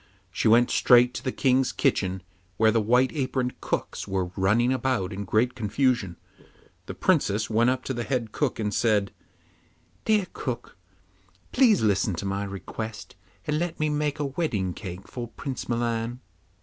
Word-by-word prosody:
She -, -, 0 dB
went 120 Hz, +2 st, +5 dB
straight 125 Hz, 0 st, +5 dB
to -, -, -6 dB
the 130 Hz, -, -1 dB
King's 130 Hz, 0 st, +2 dB
kitchen, 95 Hz, -1 st, 0 dB, 0.3 s
where 110 Hz, +2 st, +4 dB
the 115 Hz, 0 st, +2 dB
white 125 Hz, +4 st, +3 dB
aproned 130 Hz, -3 st, -2 dB
cooks -, -, -3 dB
were 95 Hz, -2 st, -2 dB
running 110 Hz, +7 st, +2 dB
about 125 Hz, -7 st, -1 dB
in 100 Hz, +1 st, -5 dB
great 115 Hz, +6 st, +1 dB
confusion. 115 Hz, -4 st, 0 dB, 0.7 s
The -, -, -6 dB
Princess 110 Hz, +3 st, +1 dB
went 115 Hz, +3 st, +3 dB
up 130 Hz, 0 st, -1 dB
to 130 Hz, -, -3 dB
the 120 Hz, -, -3 dB
head 115 Hz, -1 st, -2 dB
cook, 145 Hz, 0 st, -1 dB
and 105 Hz, -2 st, -1 dB
said, 105 Hz, -2 st, +2 dB, 0.9 s
'Dear 215 Hz, -3 st, +3 dB
cook, 120 Hz, -3 st, -5 dB, 0.8 s
please 240 Hz, -, +4 dB
listen 100 Hz, -2 st, +2 dB
to 90 Hz, -, -5 dB
my 100 Hz, +1 st, -2 dB
request, 100 Hz, +2 st, -7 dB, 0.3 s
and 150 Hz, 0 st, 0 dB
let 170 Hz, -1 st, -3 dB
me 155 Hz, 0 st, +1 dB
make 150 Hz, -1 st, -1 dB
a 145 Hz, -, -1 dB
wedding 130 Hz, -, -1 dB
cake 95 Hz, 0 st, -8 dB
for 120 Hz, -2 st, -6 dB
Prince 130 Hz, +2 st, -6 dB
Milan. 120 Hz, 0 st, -1 dB
120 Hz, 160 wpm, -26 LUFS, 100-130 Hz, 0.9 s, went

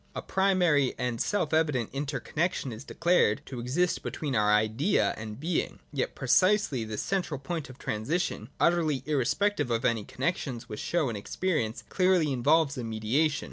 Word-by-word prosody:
A -, -, -3 dB
primary 180 Hz, -8 st, +2 dB
and 120 Hz, -2 st, -2 dB
self 200 Hz, -7 st, 0 dB
evident 150 Hz, -8 st, +1 dB
inter 140 Hz, 0 st, -2 dB
connexion 155 Hz, 0 st, -2 dB
is 110 Hz, -, -8 dB
declared 165 Hz, -11 st, +2 dB
to 130 Hz, -2 st, -7 dB
exist 150 Hz, +10 st, 0 dB
between 145 Hz, -4 st, -3 dB
our 105 Hz, -1 st, +3 dB
Idea 110 Hz, -, +2 dB
and 110 Hz, 0 st, -7 dB
being. 165 Hz, +3 st, -1 dB, 0.2 s
Yet 135 Hz, -, -2 dB
precisely 185 Hz, -, +3 dB
this 110 Hz, -1 st, -4 dB
central 180 Hz, -7 st, -2 dB
point 150 Hz, +1 st, -4 dB
of 130 Hz, -, -11 dB
transi 110 Hz, +11 st, -1 dB
tion, 175 Hz, -, -3 dB
utterly 160 Hz, -6 st, +2 dB
irrespective 150 Hz, +3 st, +1 dB
of 115 Hz, +2 st, 0 dB
any 115 Hz, -4 st, +1 dB
connexions 135 Hz, -, -3 dB
which 105 Hz, -, -6 dB
show 170 Hz, -4 st, 0 dB
in 115 Hz, -, -4 dB
experience, 115 Hz, -, -2 dB
clearly 180 Hz, -5 st, +2 dB
involves 145 Hz, +2 st, +2 dB
a -, -, -3 dB
mediation. 115 Hz, +8 st, 0 dB
145 Hz, 165 wpm, -28 LUFS, 120-170 Hz, 0.2 s, our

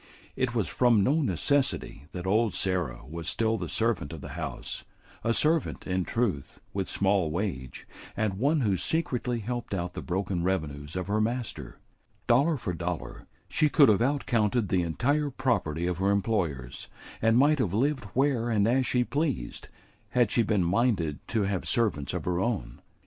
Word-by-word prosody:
It 130 Hz, -2 st, -1 dB
was 110 Hz, -5 st, +1 dB
from 120 Hz, -5 st, +3 dB
no 150 Hz, +10 st, +2 dB
necessity 135 Hz, -, 0 dB
that 90 Hz, 0 st, -6 dB
old 110 Hz, +2 st, +2 dB
Sarah 90 Hz, -11 st, -1 dB
was 80 Hz, +2 st, -4 dB
still 110 Hz, -1 st, +1 dB
the 90 Hz, -6 st, -4 dB
servant 110 Hz, -11 st, 0 dB
of 80 Hz, -, -7 dB
the -, -, -8 dB
house; -, -, -5 dB, 0.4 s
a 115 Hz, -, +1 dB
servant, 155 Hz, +6 st, +2 dB
in 90 Hz, -1 st, -1 dB
truth, 100 Hz, -, -2 dB
with 95 Hz, -2 st, -2 dB
small 95 Hz, -4 st, +2 dB
wage, 80 Hz, -7 st, -4 dB, 0.3 s
and 100 Hz, -3 st, -1 dB
one 145 Hz, +4 st, +2 dB
who 100 Hz, -6 st, +2 dB
secretly 125 Hz, -, -1 dB
helped 120 Hz, -1 st, -3 dB
out 90 Hz, -1 st, -3 dB
the -, -, -5 dB
broken 95 Hz, 0 st, -2 dB
revenues 80 Hz, -5 st, -2 dB
of 90 Hz, -1 st, -2 dB
her 105 Hz, +3 st, 0 dB
master. 120 Hz, +1 st, -3 dB, 0.5 s
Dollar 140 Hz, +7 st, +3 dB
for 115 Hz, -7 st, -3 dB
dollar, 85 Hz, 0 st, -5 dB, 0.2 s
she 155 Hz, -, +2 dB
could 140 Hz, -4 st, +6 dB
have 105 Hz, 0 st, +4 dB
out 140 Hz, +3 st, +1 dB
counted 110 Hz, -3 st, +1 dB
the 95 Hz, -, +2 dB
entire 140 Hz, -, 0 dB
property 105 Hz, -, -1 dB
of 90 Hz, -1 st, -1 dB
her 95 Hz, +1 st, +2 dB
employers; 95 Hz, -, -1 dB, 0.3 s
and 115 Hz, +1 st, +4 dB
might 145 Hz, +3 st, +4 dB
have 100 Hz, -6 st, 0 dB
lived 135 Hz, +1 st, +1 dB
where 130 Hz, -3 st, +2 dB
and 105 Hz, -2 st, +2 dB
as 130 Hz, +2 st, +2 dB
she 125 Hz, -1 st, +2 dB
pleased, 135 Hz, -, -2 dB, 0.4 s
had 120 Hz, -4 st, +2 dB
she 120 Hz, -, +3 dB
been 105 Hz, -4 st, +1 dB
minded 90 Hz, -, +1 dB
to 110 Hz, -3 st, 0 dB
have 95 Hz, -2 st, -2 dB
servants 100 Hz, -, +1 dB
of -, -, -4 dB
her 90 Hz, -1 st, 0 dB
own. 95 Hz, -, -2 dB
105 Hz, 175 wpm, -28 LUFS, 90-125 Hz, 0.5 s, could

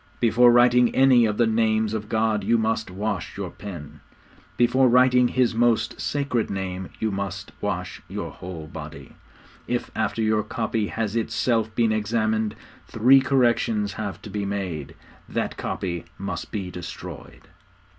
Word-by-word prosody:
Before 120 Hz, +1 st, +5 dB
writing 120 Hz, 0 st, +5 dB
any 130 Hz, -3 st, +6 dB
of 105 Hz, -1 st, -2 dB
the 120 Hz, -, +4 dB
names 110 Hz, -1 st, +1 dB
of 105 Hz, -1 st, -4 dB
God 110 Hz, -2 st, +1 dB
you 115 Hz, +4 st, +3 dB
must 110 Hz, -1 st, -1 dB
wash 100 Hz, 0 st, -4 dB
your -, -, -4 dB
pen: 75 Hz, -7 st, -9 dB, 0.6 s
before 125 Hz, +2 st, +4 dB
writing 125 Hz, 0 st, +5 dB
His 125 Hz, -1 st, +1 dB
most 115 Hz, -1 st, +1 dB
sacred 140 Hz, -6 st, -1 dB
Name 95 Hz, -1 st, -4 dB
you 110 Hz, -1 st, 0 dB
must 95 Hz, -1 st, -4 dB
wash -, -, -3 dB
your -, -, -5 dB
whole 90 Hz, -3 st, -8 dB
body. -, -, -9 dB, 0.6 s
If, 120 Hz, 0 st, -2 dB
after 110 Hz, +1 st, -1 dB
your 110 Hz, 0 st, +2 dB
copy 110 Hz, 0 st, -2 dB
has 110 Hz, -1 st, -3 dB
itself 115 Hz, -1 st, 0 dB
been 115 Hz, -2 st, +2 dB
examined, 110 Hz, 0 st, 0 dB, 0.3 s
three 125 Hz, +5 st, +5 dB
corrections 120 Hz, -6 st, +1 dB
have 100 Hz, -5 st, -5 dB
to 105 Hz, -, -8 dB
be 105 Hz, 0 st, -2 dB
made, 95 Hz, -7 st, -4 dB, 0.3 s
that -, -, -2 dB
copy 85 Hz, -2 st, -4 dB
must 100 Hz, +1 st, -5 dB
be 95 Hz, -4 st, -4 dB
destroyed.' 90 Hz, -1 st, -9 dB
110 Hz, 145 wpm, -24 LUFS, 100-120 Hz, 0.6 s, any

